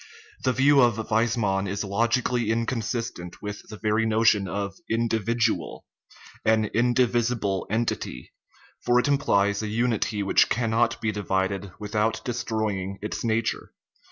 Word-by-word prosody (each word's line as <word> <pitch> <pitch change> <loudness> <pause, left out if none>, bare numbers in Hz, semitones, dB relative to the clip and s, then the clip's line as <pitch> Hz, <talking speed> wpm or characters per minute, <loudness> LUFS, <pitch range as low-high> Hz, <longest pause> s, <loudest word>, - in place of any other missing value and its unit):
The 130 - +3
view 135 +2 +5
of 120 -3 +4 0.2
Weismann 110 -3 +1
is 100 +2 -2
logically 115 +3 0
inconsistent 115 -5 -2
with 105 0 -6
the 105 - -8
very 110 +1 +1
notion 110 -3 +3
of 100 0 -3 0.2
individual 115 0 0 0.6
an 110 0 +3
"indivisible" 120 -4 +1
en 115 +3 +1
tity; 60 - -4 0.5
for 120 0 +3
it 125 - +3
implies 100 -8 +2
a 110 - -3
unity 110 -2 0
which 100 - +3
cannot 115 0 +1
be 110 - 0
divided 95 -1 -2
without 105 +1 -1
destroying 110 -5 -2
its 105 - -4
nature. 115 -1 -1
110 Hz, 130 wpm, -25 LUFS, 100-120 Hz, 0.6 s, view